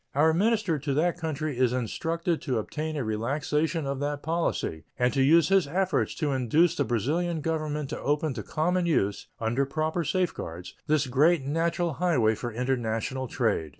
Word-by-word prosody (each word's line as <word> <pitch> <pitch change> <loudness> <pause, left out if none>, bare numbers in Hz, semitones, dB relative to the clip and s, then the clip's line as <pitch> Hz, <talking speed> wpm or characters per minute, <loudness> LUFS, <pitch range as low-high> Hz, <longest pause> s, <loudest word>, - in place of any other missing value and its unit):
Our 160 +3 +4
minister 205 -3 +1
to 140 0 -2
that 170 +3 +1
country 155 -4 -3
is 125 -1 +3
instructed 165 - -1
to 130 -5 -1
obtain 155 +8 -3
a 140 - -1
relaxation 145 +8 -1
of 140 -1 -2
that 145 0 -3
policy 160 - -1
and 125 0 +2
to 135 - +2
use 160 +5 +5
his 195 -5 +4
efforts 180 0 0
to 150 -3 -1
induce 150 +7 +2
the 145 - +1
Brazilian 155 - 0
Government 150 -2 -2
to - - -4
open 150 0 0
to 115 - -5
common 175 - 0
use, 105 -11 0
under 115 +4 +1
proper 155 +4 -1
safeguards, 145 - -3
this 150 -1 +2
great 145 +5 +3
natural 165 +3 0
highway 130 -12 +3
for 120 +2 -5
international 125 +1 -2
trade. 110 - 0
150 Hz, 170 wpm, -27 LUFS, 125-165 Hz, -, use